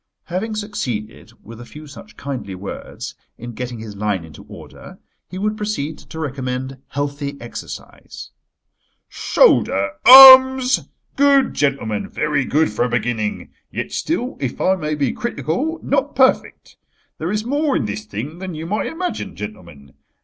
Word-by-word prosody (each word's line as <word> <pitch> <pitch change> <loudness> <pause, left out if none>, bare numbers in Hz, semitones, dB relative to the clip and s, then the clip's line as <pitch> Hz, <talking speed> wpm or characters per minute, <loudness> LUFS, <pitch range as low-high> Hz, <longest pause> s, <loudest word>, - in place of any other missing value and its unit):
Having 205 +5 -4
succeeded, 125 - -5
with 115 +1 -11
a - - -10
few 150 +1 -12
such 150 +8 -14
kindly 125 -9 -6
words, 95 +2 -8 0.2
in 120 +1 -8
getting 125 +1 -6
his 110 -2 -9
line 100 -4 -2
into 80 -2 -13
order, - - -13 0.3
he 185 - -8
would 210 +2 -1
proceed 205 -8 -4
to - - -12
recommend 130 -2 -4
healthy 140 0 -4
exercise. 120 - -10 0.8
"Shoulder 100 +1 +2
arms! 260 0 +9 0.3
Good, 280 -1 +3
gentlemen, 135 -7 -1
very 150 -3 -1
good 155 -1 +1
for 105 - -1
a - - -2
beginning. 115 -3 -2 0.2
Yet - - -5
still, 265 -6 -3
if 130 -3 -4
I 190 - +2
may 155 -4 -3
be 140 -3 0
critical, 240 - -3
not - - -1
perfect. - - +1 0.4
There 160 - -3
is 210 +2 -2
more 285 +2 0
in 120 - -2
this 105 +1 -5
thing 125 - -7
than 185 -3 -6
you 155 +1 -6
might 205 +5 -2
imagine, 355 +2 -5
gentlemen. 85 -10 -10
145 Hz, 150 wpm, -19 LUFS, -, 0.8 s, arms